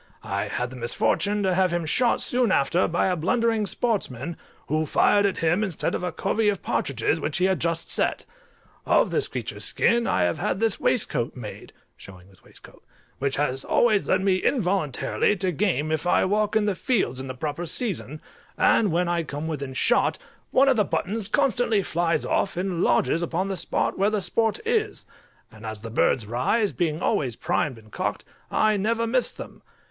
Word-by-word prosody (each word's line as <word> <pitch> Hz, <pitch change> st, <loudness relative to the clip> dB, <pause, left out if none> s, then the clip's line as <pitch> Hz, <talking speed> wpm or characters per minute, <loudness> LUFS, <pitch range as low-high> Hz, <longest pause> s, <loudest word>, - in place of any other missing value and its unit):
I -, -, -2 dB
had 125 Hz, 0 st, -3 dB
the -, -, -9 dB
misfortune 200 Hz, -, 0 dB
to 190 Hz, -1 st, +2 dB
have 185 Hz, 0 st, +3 dB
him 175 Hz, -1 st, -1 dB
shot 235 Hz, +10 st, +2 dB
soon 245 Hz, -4 st, +1 dB
after 170 Hz, +5 st, +2 dB
by 170 Hz, -, 0 dB
a 185 Hz, -, +1 dB
blundering 225 Hz, +5 st, +1 dB
sportsman, 180 Hz, -, -2 dB, 0.3 s
who 155 Hz, +1 st, 0 dB
fired 205 Hz, +7 st, +3 dB
at 195 Hz, -, -3 dB
him 175 Hz, +6 st, +2 dB
instead 190 Hz, -7 st, -2 dB
of -, -, -2 dB
a 180 Hz, -, -2 dB
covey 215 Hz, -1 st, 0 dB
of 200 Hz, -3 st, -3 dB
partridges 140 Hz, +5 st, -1 dB
which 145 Hz, -, -2 dB
he 180 Hz, -, +2 dB
had 190 Hz, -1 st, +1 dB
just 165 Hz, 0 st, -1 dB
set. -, -, -1 dB, 0.6 s
Of -, -, +3 dB
this -, -, 0 dB
creature's -, -, -5 dB
skin 235 Hz, 0 st, +2 dB
I 90 Hz, -, +2 dB
have 85 Hz, -1 st, 0 dB
had 190 Hz, -, -1 dB
this 225 Hz, -2 st, +1 dB
waistcoat 135 Hz, -, 0 dB
made 115 Hz, -5 st, -9 dB, 0.3 s
(showing 95 Hz, 0 st, -14 dB
his 95 Hz, -, -20 dB
waistcoat), -, -, -15 dB, 0.4 s
which 135 Hz, 0 st, -1 dB
always 150 Hz, -, +1 dB
leads 185 Hz, 0 st, +2 dB
me 190 Hz, -1 st, +3 dB
involuntarily 190 Hz, -, 0 dB
to 185 Hz, -1 st, -1 dB
game 155 Hz, -4 st, 0 dB
if 155 Hz, +2 st, -1 dB
I -, -, +3 dB
walk 210 Hz, +2 st, 0 dB
in 220 Hz, -1 st, +3 dB
the 205 Hz, -, +1 dB
fields 180 Hz, -, -1 dB
in 135 Hz, -, -7 dB
the 130 Hz, -, -6 dB
proper 150 Hz, +5 st, -4 dB
season, 160 Hz, -, -3 dB, 0.3 s
and 210 Hz, -5 st, +3 dB
when 175 Hz, +2 st, +1 dB
I 175 Hz, 0 st, 0 dB
come 145 Hz, -1 st, -5 dB
within 140 Hz, -4 st, -5 dB
shot, 240 Hz, -, +2 dB, 0.3 s
one 270 Hz, +2 st, +4 dB
of 265 Hz, -3 st, +4 dB
the 210 Hz, -, +4 dB
buttons 205 Hz, +2 st, -2 dB
constantly 245 Hz, -5 st, +1 dB
flies 170 Hz, -2 st, 0 dB
off, 195 Hz, -, 0 dB
and 180 Hz, -2 st, -2 dB
lodges 125 Hz, +7 st, +2 dB
upon 175 Hz, +3 st, -2 dB
the 195 Hz, -, -2 dB
spot -, -, -1 dB
where 200 Hz, +2 st, +3 dB
the 215 Hz, -1 st, 0 dB
sport 220 Hz, +4 st, 0 dB
is; 440 Hz, -2 st, -1 dB, 0.5 s
and 110 Hz, -1 st, -15 dB
as 110 Hz, -1 st, -6 dB
the 115 Hz, 0 st, -7 dB
birds 115 Hz, 0 st, +2 dB
rise, 130 Hz, -, 0 dB
being 160 Hz, -1 st, -2 dB
always 125 Hz, -6 st, 0 dB
primed 130 Hz, +1 st, -1 dB
and 110 Hz, -1 st, -17 dB
cocked, -, -, -3 dB, 0.2 s
I 215 Hz, -1 st, +2 dB
never 230 Hz, +3 st, 0 dB
miss 245 Hz, +2 st, +1 dB
them. -, -, -10 dB
180 Hz, 190 wpm, -25 LUFS, 145-210 Hz, 0.6 s, one